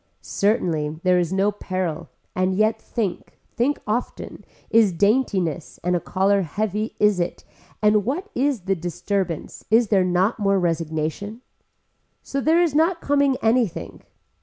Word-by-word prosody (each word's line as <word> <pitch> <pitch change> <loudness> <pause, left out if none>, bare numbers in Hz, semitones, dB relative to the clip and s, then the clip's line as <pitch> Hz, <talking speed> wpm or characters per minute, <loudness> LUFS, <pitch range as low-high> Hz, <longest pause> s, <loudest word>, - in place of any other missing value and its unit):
Certainly 160 -8 0
there 180 -1 +4
is 175 -1 -1
no 195 +2 +2
peril 185 -5 -4 0.3
and 185 0 +1
yet 215 +2 +1
think, 205 -7 -4 0.2
think 270 +4 +1
often, 225 +4 -4 0.3
is 220 -3 +5
daintiness 195 - 0
and 180 +1 +1
a - - +1
collar 195 +3 +1
heavy 210 +5 -2
is 210 -3 +3
it 175 0 -3 0.4
and 210 0 +4
what 305 - -2
is 270 -3 0
the 195 +2 0
disturbance, 175 0 -3
is 225 0 +4
there 195 -3 +4
not 185 +5 +1
more 195 -1 +2
registration. 165 +5 -2 0.8
So 275 - -3
there 325 +5 +4
is 330 -5 0
not 330 +3 +2
coming 280 -3 +2
anything. 225 -4 0
200 Hz, 140 wpm, -23 LUFS, 180-230 Hz, 0.8 s, is